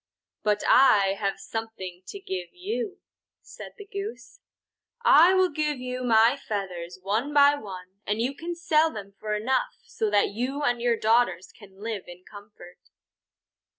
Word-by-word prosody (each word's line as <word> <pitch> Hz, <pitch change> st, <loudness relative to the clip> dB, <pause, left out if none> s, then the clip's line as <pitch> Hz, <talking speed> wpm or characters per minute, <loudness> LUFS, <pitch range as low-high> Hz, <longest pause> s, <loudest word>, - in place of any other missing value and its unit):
"But 210 Hz, -1 st, 0 dB
I 205 Hz, -7 st, +5 dB
have 195 Hz, -2 st, -2 dB
something 205 Hz, -6 st, -6 dB
to 400 Hz, -, -7 dB
give 185 Hz, -, -5 dB
you," 410 Hz, +2 st, -4 dB, 0.4 s
said -, -, -11 dB
the 415 Hz, -, -10 dB
Goose. 410 Hz, +4 st, -7 dB, 0.7 s
"I 345 Hz, +2 st, +7 dB
will 375 Hz, -1 st, +4 dB
give 300 Hz, -2 st, -1 dB, 0.3 s
my 230 Hz, +1 st, +5 dB
feathers, 185 Hz, -8 st, -5 dB
one 225 Hz, +9 st, -1 dB
by 285 Hz, 0 st, +7 dB
one, 190 Hz, -7 st, -9 dB
and 210 Hz, +1 st, -1 dB
you 250 Hz, +4 st, 0 dB
can 340 Hz, +4 st, -6 dB
sell 325 Hz, -2 st, +2 dB
them 200 Hz, -4 st, -9 dB
for 215 Hz, -1 st, -2 dB
enough 250 Hz, +5 st, -1 dB
so 220 Hz, -, -2 dB
that 205 Hz, 0 st, +3 dB
you 255 Hz, +7 st, -3 dB
and 245 Hz, -4 st, +1 dB
your 240 Hz, -1 st, +2 dB
daughters 220 Hz, -5 st, +1 dB
can 200 Hz, -2 st, -16 dB
live 220 Hz, -4 st, -4 dB
in 175 Hz, +1 st, -12 dB
comfort." 205 Hz, -4 st, -14 dB
225 Hz, 150 wpm, -26 LUFS, 200-295 Hz, 0.7 s, I